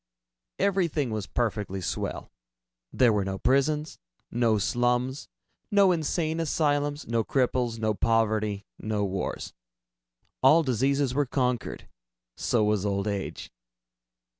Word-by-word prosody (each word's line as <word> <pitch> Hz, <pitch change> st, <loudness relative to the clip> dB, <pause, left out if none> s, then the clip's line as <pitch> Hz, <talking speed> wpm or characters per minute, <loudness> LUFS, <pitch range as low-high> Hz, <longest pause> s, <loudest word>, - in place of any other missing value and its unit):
Everything 170 Hz, -, +1 dB
was 110 Hz, -2 st, -3 dB
perfectly 105 Hz, -5 st, -2 dB
swell. 90 Hz, -, -4 dB, 0.6 s
There 120 Hz, -3 st, +4 dB
were 105 Hz, -2 st, +1 dB
no 95 Hz, 0 st, -3 dB
prisons, 150 Hz, +6 st, +1 dB, 0.3 s
no 115 Hz, -2 st, +2 dB
slums, 125 Hz, +5 st, 0 dB, 0.4 s
no 200 Hz, -2 st, +5 dB
insane 160 Hz, -1 st, -1 dB
asylums, 145 Hz, -2 st, 0 dB
no 115 Hz, -1 st, +1 dB
cripples, 125 Hz, -2 st, 0 dB
no 110 Hz, -1 st, 0 dB
poverty, 110 Hz, -2 st, +1 dB
no 105 Hz, -1 st, -1 dB
wars. 95 Hz, -1 st, -4 dB, 0.9 s
All 150 Hz, +6 st, +6 dB
diseases 135 Hz, +1 st, +1 dB
were 145 Hz, 0 st, +1 dB
conquered. 125 Hz, -2 st, -2 dB, 0.5 s
So 115 Hz, -3 st, +1 dB
was 105 Hz, -2 st, +1 dB
old 100 Hz, 0 st, -1 dB
age. 100 Hz, -2 st, -4 dB
120 Hz, 115 wpm, -27 LUFS, 105-145 Hz, 0.9 s, All